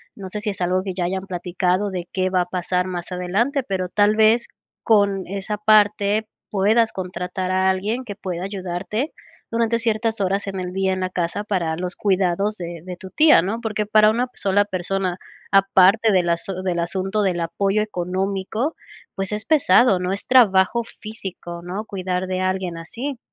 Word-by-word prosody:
no 190 Hz, -2 st, -8 dB
sé 210 Hz, +2 st, -5 dB
si 210 Hz, -, -2 dB
es 195 Hz, -, -5 dB
algo 180 Hz, +1 st, +1 dB
que 190 Hz, -2 st, -4 dB
ya 180 Hz, -2 st, -1 dB
hayan 190 Hz, +2 st, -3 dB
platicado 185 Hz, +2 st, -1 dB
de 180 Hz, -2 st, -5 dB
qué 185 Hz, -1 st, 0 dB
va 185 Hz, -1 st, +3 dB
a -, -, -1 dB
pasar 180 Hz, 0 st, -1 dB
más 175 Hz, -1 st, -5 dB
adelante, 200 Hz, +10 st, 0 dB
pero 190 Hz, -6 st, -2 dB
tal 205 Hz, +3 st, +3 dB
vez, 220 Hz, +2 st, +4 dB, 0.3 s
con 200 Hz, -3 st, +2 dB
esa 200 Hz, +2 st, -4 dB
parte 210 Hz, 0 st, +3 dB, 0.2 s
puedas 220 Hz, +3 st, +3 dB
contratar 185 Hz, 0 st, -4 dB
a 190 Hz, 0 st, +2 dB
alguien 205 Hz, +7 st, -1 dB
que 205 Hz, -4 st, -6 dB
pueda 185 Hz, -3 st, -5 dB
ayudarte, 195 Hz, -, -3 dB, 0.4 s
durante 230 Hz, 0 st, +1 dB
ciertas 225 Hz, -1 st, 0 dB
horas 195 Hz, +1 st, 0 dB
en 195 Hz, -1 st, -3 dB
el 180 Hz, 0 st, -5 dB
día, 190 Hz, 0 st, +1 dB
en 185 Hz, -, -1 dB
la 185 Hz, -, -1 dB
casa, 180 Hz, +2 st, -2 dB
para 170 Hz, -6 st, -1 dB
los 180 Hz, +1 st, -4 dB
cuidados 195 Hz, 0 st, +1 dB
de 170 Hz, -2 st, -6 dB
de 180 Hz, 0 st, -7 dB
tu 190 Hz, +1 st, -11 dB
tía 310 Hz, -, +6 dB
¿no?, 220 Hz, +5 st, -3 dB
porque 215 Hz, -2 st, -2 dB
para 215 Hz, 0 st, +5 dB
una 240 Hz, +3 st, 0 dB
sola 205 Hz, +1 st, +1 dB
persona, 185 Hz, -1 st, -2 dB, 0.3 s
aparte 195 Hz, +3 st, +5 dB
del 180 Hz, -3 st, +2 dB
asu 180 Hz, +2 st, -2 dB
del 180 Hz, -2 st, -1 dB
asunto 190 Hz, +4 st, -1 dB
del 185 Hz, -4 st, 0 dB
apoyo 195 Hz, +5 st, 0 dB
económico, 195 Hz, -, -2 dB, 0.4 s
pues, 195 Hz, 0 st, -3 dB
es 210 Hz, +1 st, -3 dB
pesado, 240 Hz, -, +4 dB
¿no?, 180 Hz, 0 st, -2 dB
es 195 Hz, -, -4 dB
trabajo 235 Hz, -2 st, +4 dB, 0.2 s
físico, 190 Hz, -5 st, -7 dB
¿no?, 190 Hz, +5 st, -5 dB
cuidar 185 Hz, -2 st, -3 dB
de 185 Hz, 0 st, -2 dB
alguien 185 Hz, -2 st, -1 dB
así. 240 Hz, +11 st, -6 dB
195 Hz, 185 wpm, -22 LUFS, 180-215 Hz, 0.4 s, tía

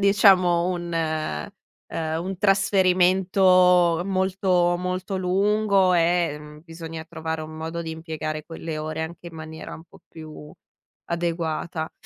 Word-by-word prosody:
diciamo 190 Hz, -4 st, +4 dB
un, 175 Hz, -1 st, -4 dB
ehm 160 Hz, +2 st, -2 dB, 0.4 s
un 165 Hz, +4 st, -3 dB
trasferimento 185 Hz, -2 st, +4 dB
molto, 185 Hz, -2 st, +1 dB
molto 185 Hz, +2 st, -3 dB
lungo 195 Hz, +1 st, +2 dB
e, 170 Hz, -2 st, +2 dB
mhmm, 150 Hz, 0 st, -12 dB
bisogna 165 Hz, -1 st, -8 dB
trovare 160 Hz, -1 st, -5 dB
un 155 Hz, -, -8 dB
modo 165 Hz, +1 st, -5 dB
di 165 Hz, -, -5 dB
impiegare 160 Hz, -1 st, -5 dB
quelle 165 Hz, -1 st, -6 dB
ore 155 Hz, +1 st, -4 dB
anche 170 Hz, +2 st, -8 dB
in 170 Hz, -, -10 dB
maniera 160 Hz, 0 st, -8 dB
un -, -, -11 dB
po' 170 Hz, -, -19 dB
più 155 Hz, -2 st, -11 dB, 0.5 s
adeguata. 165 Hz, -1 st, -3 dB
170 Hz, 125 wpm, -24 LUFS, 160-185 Hz, 0.5 s, diciamo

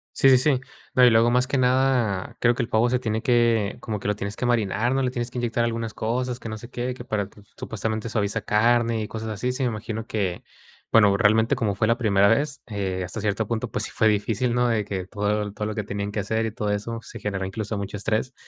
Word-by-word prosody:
Sí, 135 Hz, -, +5 dB
sí, 130 Hz, -, +7 dB
sí. 130 Hz, 0 st, +2 dB, 0.3 s
No, 125 Hz, 0 st, +6 dB
y -, -, +8 dB
luego 115 Hz, +1 st, +4 dB
más 125 Hz, +1 st, +2 dB
que 140 Hz, -, 0 dB
nada, 125 Hz, -6 st, +1 dB
creo 120 Hz, 0 st, +4 dB
que 125 Hz, -, -2 dB
el 115 Hz, -, -2 dB
pavo 115 Hz, +2 st, +3 dB
se 125 Hz, 0 st, +1 dB
tiene 110 Hz, -2 st, -2 dB
que, 115 Hz, -5 st, +2 dB
como 110 Hz, -2 st, -4 dB
que 105 Hz, -, -3 dB
lo 105 Hz, -, +1 dB
tienes 100 Hz, 0 st, -4 dB
que 125 Hz, -, -3 dB
marinar, 120 Hz, 0 st, +1 dB
¿no?, 135 Hz, -, +1 dB
le 130 Hz, -, +1 dB
tienes 120 Hz, -1 st, -4 dB
que -, -, -7 dB
inyectar 120 Hz, -1 st, 0 dB
algunas 115 Hz, -1 st, -2 dB
cosas, 125 Hz, +2 st, -2 dB
que 115 Hz, -, -8 dB
no 110 Hz, -, -5 dB
sé 120 Hz, +2 st, -11 dB
qué, 125 Hz, +1 st, -3 dB
que 125 Hz, -1 st, -10 dB
para 105 Hz, -4 st, -1 dB
t 105 Hz, -, -18 dB, 0.2 s
supuestamente 110 Hz, +1 st, -3 dB
suaviza 105 Hz, -3 st, -1 dB
carne 115 Hz, +1 st, +2 dB
y 105 Hz, -, -3 dB
cosas 110 Hz, 0 st, -5 dB
así. 125 Hz, +4 st, -2 dB
Sí, 135 Hz, -, -2 dB
me 125 Hz, -, +2 dB
imagino 110 Hz, 0 st, -5 dB
que, 95 Hz, -6 st, -2 dB, 0.5 s
bueno, 105 Hz, -3 st, +6 dB
realmente, 110 Hz, +2 st, +3 dB
como 105 Hz, -4 st, -1 dB
fue 110 Hz, +3 st, +1 dB
la 115 Hz, -, +2 dB
primera 100 Hz, -4 st, +3 dB
vez, 140 Hz, +6 st, +1 dB
eh, 95 Hz, -4 st, -2 dB
hasta 100 Hz, +4 st, -5 dB
cierto 105 Hz, +1 st, -1 dB
punto, 115 Hz, -1 st, -2 dB
pues -, -, 0 dB
sí -, -, -6 dB
fue 110 Hz, -, +3 dB
difícil, 110 Hz, +3 st, 0 dB
¿no?, 125 Hz, 0 st, +2 dB
de 115 Hz, -3 st, +1 dB
que 95 Hz, -2 st, -4 dB
todo 105 Hz, 0 st, -1 dB
todo 105 Hz, 0 st, -4 dB
lo 110 Hz, -, -3 dB
que 105 Hz, -, -2 dB
tenían 100 Hz, 0 st, -3 dB
que 105 Hz, -, -3 dB
hacer 110 Hz, +3 st, -1 dB
y 110 Hz, -, -2 dB
todo 105 Hz, -1 st, -2 dB
eso 115 Hz, +3 st, -3 dB
se -, -, -10 dB
generó 95 Hz, -2 st, -2 dB
incluso 105 Hz, +2 st, -4 dB
mucho 100 Hz, 0 st, -5 dB
estrés. 110 Hz, +5 st, -1 dB
110 Hz, 255 wpm, -24 LUFS, 105-120 Hz, 0.5 s, y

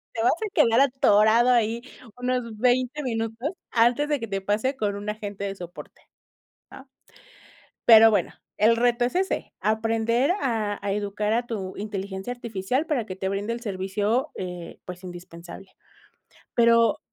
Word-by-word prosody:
Te 225 Hz, -, -1 dB
vas -, -, +5 dB
a 430 Hz, +5 st, -3 dB
quedar 230 Hz, +1 st, +4 dB
atorado 240 Hz, -4 st, +4 dB
ahí 230 Hz, -1 st, +1 dB, 0.3 s
unos 250 Hz, -3 st, -3 dB
20 255 Hz, +4 st, +1 dB
minutos 225 Hz, +1 st, -2 dB, 0.2 s
antes 240 Hz, +5 st, +2 dB
de 295 Hz, -1 st, +1 dB
que 230 Hz, -, -4 dB
te 195 Hz, -1 st, -1 dB
pase 215 Hz, +8 st, -1 dB
con 205 Hz, -4 st, -1 dB
un 205 Hz, +1 st, -5 dB
agente 205 Hz, -2 st, -5 dB
de 195 Hz, -1 st, -3 dB
soporte, 175 Hz, -1 st, -11 dB, 0.7 s
¿ah? 265 Hz, +1 st, -12 dB, 1.0 s
Pero 225 Hz, -1 st, +9 dB
bueno, 210 Hz, -, 0 dB, 0.2 s
el 225 Hz, +2 st, +4 dB
reto 240 Hz, +1 st, +2 dB
es 245 Hz, -, -2 dB
ese. 380 Hz, +1 st, -1 dB
Aprender 225 Hz, +4 st, +1 dB
a 220 Hz, -6 st, -1 dB
a 200 Hz, -, 0 dB
educar 205 Hz, +1 st, -2 dB
a 240 Hz, +2 st, 0 dB
tu 195 Hz, -5 st, -5 dB
inteligencia 200 Hz, +1 st, -5 dB
artificial 240 Hz, -, -2 dB
para 275 Hz, -8 st, -1 dB
que 185 Hz, -, -6 dB
te 190 Hz, 0 st, -3 dB
brinde 200 Hz, +3 st, -2 dB
el 235 Hz, -, -5 dB
servicio, 210 Hz, +6 st, -1 dB
eh, 180 Hz, -2 st, -7 dB
pues, 180 Hz, +1 st, -9 dB
indispensable. 175 Hz, +1 st, -10 dB, 0.9 s
Pero 230 Hz, -1 st, +4 dB
225 Hz, 155 wpm, -25 LUFS, 200-245 Hz, 1.0 s, Pero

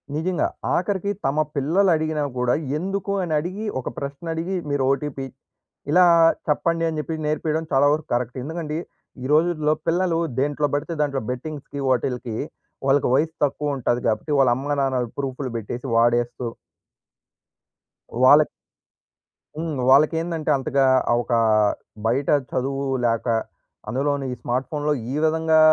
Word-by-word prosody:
నిజంగా. 175 Hz, +3 st, 0 dB, 0.3 s
ఆఖరికి 200 Hz, +2 st, 0 dB
తమ 135 Hz, +3 st, +1 dB, 0.2 s
పిల్లలు 170 Hz, +8 st, +2 dB
అడిగినా 155 Hz, -1 st, -1 dB
కూడా 125 Hz, 0 st, +2 dB, 0.2 s
ఎందుకు 195 Hz, +3 st, -2 dB
అని 160 Hz, -3 st, -2 dB
అడిగి 185 Hz, +7 st, -5 dB
ఒక 130 Hz, -, -4 dB
ప్రశ్న 140 Hz, +3 st, -6 dB
అడిగి 170 Hz, +4 st, -3 dB
మీరు 140 Hz, -2 st, 0 dB
ఓటీపీ 140 Hz, -1 st, -2 dB, 0.7 s
ఇలా 180 Hz, +3 st, +6 dB, 0.4 s
చెప్పండి 165 Hz, +2 st, +1 dB
అని 155 Hz, -, -4 dB
చెప్పి 160 Hz, +1 st, -3 dB
నేర్పియడం 155 Hz, +1 st, -1 dB
చాలా 140 Hz, +1 st, +4 dB
వరకు 155 Hz, 0 st, -3 dB
కరెక్ట్. 120 Hz, +1 st, -1 dB
ఎందుకంటే 160 Hz, 0 st, -4 dB, 0.5 s
ఈ -, -, -4 dB
రోజుల్లో 155 Hz, -1 st, +3 dB
పిల్లలు 170 Hz, 0 st, +1 dB, 0.2 s
దేంట్లో 145 Hz, +2 st, +1 dB
పడితే 150 Hz, +4 st, -1 dB
దాంట్లో 140 Hz, -2 st, 0 dB
బెట్టింగ్స్‌కి 140 Hz, +2 st, -6 dB
వాటిలకి 125 Hz, -2 st, -1 dB, 0.5 s
వాళ్ళకి 135 Hz, 0 st, +3 dB
వయసు 160 Hz, +3 st, +1 dB
తక్కువ 145 Hz, +1 st, -2 dB
ఉంటాది. 120 Hz, -1 st, 0 dB
కాబట్టి 110 Hz, +7 st, -1 dB
వాళ్ళ 130 Hz, -2 st, +5 dB
అమ్మ-నాన్నలు 135 Hz, -3 st, -1 dB
ప్రూఫ్‌లు 135 Hz, -1 st, -3 dB
పెట్టేసి 120 Hz, +4 st, -5 dB
వాడేస్తూ 120 Hz, +1 st, +2 dB, 1.8 s
వాళ్ళకి 150 Hz, +3 st, +7 dB, 1.1 s
హ్మ్. 160 Hz, -2 st, -3 dB
వాళ్ళకి 150 Hz, +4 st, +5 dB
ఏందంటే 165 Hz, -2 st, -3 dB
అంతగా 135 Hz, +1 st, +1 dB, 0.3 s
ఆ! -, -, +5 dB
ఒక 120 Hz, -, -8 dB, 0.7 s
బయట 130 Hz, +5 st, +1 dB, 0.2 s
చదువు 135 Hz, +2 st, -1 dB, 0.2 s
లేక 115 Hz, +1 st, 0 dB, 0.6 s
అందులోని 140 Hz, +2 st, -1 dB
ఈ -, -, -5 dB
స్మార్ట్ 125 Hz, +2 st, -1 dB
ఫోన్‌లో 150 Hz, 0 st, 0 dB, 0.2 s
ఈ -, -, -2 dB
విధంగా 160 Hz, 0 st, +3 dB
145 Hz, 135 wpm, -23 LUFS, 130-160 Hz, 1.8 s, వాళ్ళకి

